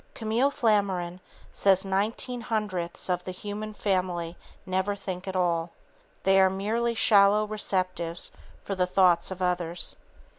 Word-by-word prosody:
Camille 230 Hz, +5 st, +1 dB
Flammarion 195 Hz, -8 st, 0 dB, 0.3 s
says 195 Hz, 0 st, +3 dB
nineteen 215 Hz, +5 st, -1 dB
hundredths 205 Hz, -7 st, -3 dB
of 180 Hz, -1 st, -1 dB
the -, -, -6 dB
human 205 Hz, +3 st, -6 dB
family 180 Hz, -5 st, -1 dB, 0.3 s
never 190 Hz, +1 st, 0 dB
think 190 Hz, -2 st, -6 dB
at 190 Hz, -, -4 dB
all. 170 Hz, -2 st, 0 dB, 0.5 s
They 195 Hz, 0 st, +5 dB
are 190 Hz, -, +5 dB
merely 225 Hz, +5 st, -1 dB
shallow 210 Hz, -1 st, +5 dB
receptives 185 Hz, -5 st, -1 dB, 0.3 s
for 200 Hz, -, -3 dB
the 180 Hz, -1 st, +1 dB
thoughts 180 Hz, -2 st, +3 dB
of 190 Hz, -1 st, -4 dB
others. 175 Hz, -1 st, 0 dB
190 Hz, 135 wpm, -27 LUFS, 180-210 Hz, 0.5 s, They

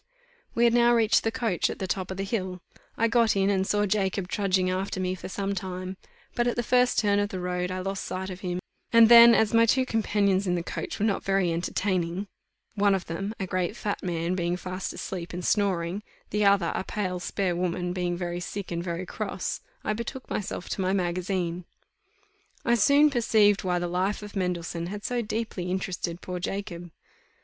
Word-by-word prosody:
We 235 Hz, -, +3 dB
had 235 Hz, -1 st, +5 dB
now 240 Hz, 0 st, +5 dB
reached 225 Hz, -1 st, +3 dB
the 225 Hz, -, 0 dB
coach 230 Hz, -8 st, 0 dB
at -, -, -5 dB
the 190 Hz, -, -3 dB
top 185 Hz, 0 st, -2 dB
of 190 Hz, -, -5 dB
the 195 Hz, -, -2 dB
hill; 190 Hz, -3 st, -3 dB, 0.4 s
I 230 Hz, -, +3 dB
got 230 Hz, -1 st, +3 dB
in, 195 Hz, 0 st, +2 dB
and 190 Hz, -1 st, +1 dB
saw 205 Hz, 0 st, +2 dB
Jacob 195 Hz, -2 st, 0 dB
trudging 190 Hz, -3 st, +1 dB
after 190 Hz, +1 st, -2 dB
me 185 Hz, 0 st, 0 dB
for 185 Hz, -, -7 dB
some 200 Hz, +1 st, -2 dB
time; 185 Hz, 0 st, -5 dB, 0.4 s
but, 240 Hz, 0 st, +1 dB
at 240 Hz, -, 0 dB
the 240 Hz, -, -1 dB
first 250 Hz, +1 st, +3 dB
turn 205 Hz, -1 st, +3 dB
of 205 Hz, 0 st, 0 dB
the 185 Hz, -, -5 dB
road, 180 Hz, 0 st, -2 dB
I 185 Hz, 0 st, -3 dB
lost 195 Hz, +1 st, -3 dB
sight 190 Hz, +1 st, -4 dB
of 180 Hz, -, -7 dB
him, 180 Hz, -2 st, -3 dB, 0.3 s
and 230 Hz, -1 st, +7 dB
then, 235 Hz, 0 st, +10 dB
as 215 Hz, +1 st, +2 dB
my 230 Hz, 0 st, +5 dB
two 260 Hz, +3 st, +3 dB
companions 205 Hz, -4 st, +1 dB
in 180 Hz, -, +2 dB
the 170 Hz, -, -2 dB
coach -, -, -5 dB
were 210 Hz, -, 0 dB
not 205 Hz, -3 st, 0 dB
very 195 Hz, -3 st, +1 dB
entertaining, 180 Hz, +1 st, -1 dB, 0.5 s
one 200 Hz, -1 st, +3 dB
of 185 Hz, -, -3 dB
them, 195 Hz, +6 st, -4 dB
a 195 Hz, -, -1 dB
great 185 Hz, +2 st, -1 dB
fat 205 Hz, -, -3 dB
man, 170 Hz, -1 st, -1 dB
being 175 Hz, -1 st, -1 dB
fast 185 Hz, +1 st, -5 dB
asleep 175 Hz, -3 st, -6 dB
and 180 Hz, 0 st, -4 dB
snoring, 190 Hz, -2 st, +1 dB, 0.3 s
the 210 Hz, 0 st, +1 dB
other, 200 Hz, -4 st, +4 dB
a -, -, -2 dB
pale 185 Hz, -3 st, -3 dB
spare 180 Hz, 0 st, -1 dB
woman, 180 Hz, 0 st, -1 dB
being 175 Hz, -1 st, -1 dB
very 175 Hz, -1 st, -3 dB
sick 195 Hz, +2 st, -6 dB
and 170 Hz, 0 st, -2 dB
very 175 Hz, +1 st, -3 dB
cross, 200 Hz, 0 st, -4 dB, 0.2 s
I 215 Hz, -, 0 dB
betook 235 Hz, +4 st, -6 dB
myself 185 Hz, -3 st, -3 dB
to -, -, -2 dB
my 185 Hz, +1 st, +1 dB
magazine. 180 Hz, -1 st, -1 dB, 1.0 s
I 235 Hz, -, +3 dB
soon 285 Hz, +6 st, +5 dB
perceived 215 Hz, -5 st, +3 dB
why 180 Hz, -1 st, +1 dB
the 175 Hz, 0 st, -1 dB
life 185 Hz, +4 st, -1 dB
of 210 Hz, 0 st, -9 dB
Mendelssohn 175 Hz, -2 st, -2 dB
had 205 Hz, +2 st, -6 dB
so 245 Hz, -1 st, 0 dB
deeply 215 Hz, -5 st, -3 dB
interested 180 Hz, -2 st, -3 dB
poor 180 Hz, -1 st, -5 dB
Jacob. 175 Hz, -2 st, -5 dB
190 Hz, 205 wpm, -27 LUFS, 180-210 Hz, 1.0 s, then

